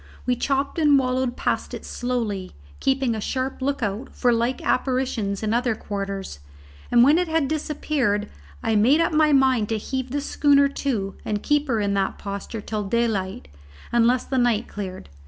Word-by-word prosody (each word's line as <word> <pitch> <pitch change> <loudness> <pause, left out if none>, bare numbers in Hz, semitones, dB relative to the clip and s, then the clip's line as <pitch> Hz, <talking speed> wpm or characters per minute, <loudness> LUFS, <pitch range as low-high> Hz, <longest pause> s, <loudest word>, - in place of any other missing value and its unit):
We 250 - +2
chopped 275 +5 -1
and 295 -3 +5
wallowed 255 -1 0
past - - -1
it - - -9
slowly, 225 -7 -3 0.3
keeping 265 -3 +1
a 220 - -4
sharp 260 +4 -3
look 275 -1 -1
out 210 +6 -3
for 245 -2 +3
like 235 +2 0
apparitions 250 -7 0
in 215 0 0
other 240 -1 +1
quarters, 195 - -5 0.5
and 240 - +6
when 295 +6 +5
it 360 - 0
had 320 -3 +1
disappeared, 285 -8 -1 0.4
I 225 -1 +1
made 245 +9 +5
up 335 - +1
my 305 0 +4
mind 260 -6 +3
to 225 - 0
heave 260 +4 -4
the 285 +3 -1
schooner 285 0 +3
to 230 -9 -2
and 210 -1 -2
keep 295 0 +2
her 230 -4 +1
in 200 -1 0
that 195 -1 0
posture 200 +2 -6
till 210 0 -3
daylight, 200 - -1 0.5
unless 240 +1 +3
the 265 - 0
night 240 -2 +2
cleared. 190 -2 -7
245 Hz, 175 wpm, -23 LUFS, 210-275 Hz, 0.5 s, and